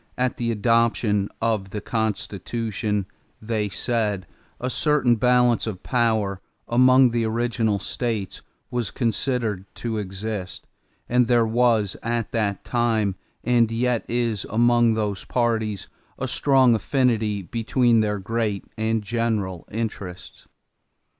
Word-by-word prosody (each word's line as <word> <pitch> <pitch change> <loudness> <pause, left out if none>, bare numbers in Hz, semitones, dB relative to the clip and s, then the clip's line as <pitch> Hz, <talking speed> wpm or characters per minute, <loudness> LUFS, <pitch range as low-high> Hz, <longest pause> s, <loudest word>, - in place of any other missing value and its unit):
"At 125 0 0
the 120 -1 -1
adoption 115 -2 +2
of 110 -4 0
the 105 - -4
Constitution," 105 -1 -2 0.3
they 110 -2 -2
said, 105 -2 -1 0.3
"a 125 - -2
certain 135 -2 +2
balance 125 0 +3
of 95 -4 -5
power 110 -6 0 0.3
among 130 +1 +5
the 115 0 0
original 115 -2 0
states 110 -2 -3 0.3
was 120 -4 -1
considered 115 -4 -1
to 115 -2 -3
exist, 100 -1 -5 0.4
and 125 0 +3
there 120 -1 +4
was 115 -3 +2
at 115 -2 -2
that 100 -4 -1
time 115 -5 +1 0.3
and 120 -2 +3
yet 120 0 0
is 115 -4 0
among 120 0 +3
those 105 -3 -2
parties 110 -4 -1 0.3
a - - -3
strong 135 -4 +4
affinity 110 -3 +1
between 115 +3 +2
their 105 -1 +1
great 105 0 -2
and 110 0 0
general 105 -5 -2
interests. 100 -5 -6
115 Hz, 120 wpm, -23 LUFS, 105-120 Hz, 0.4 s, among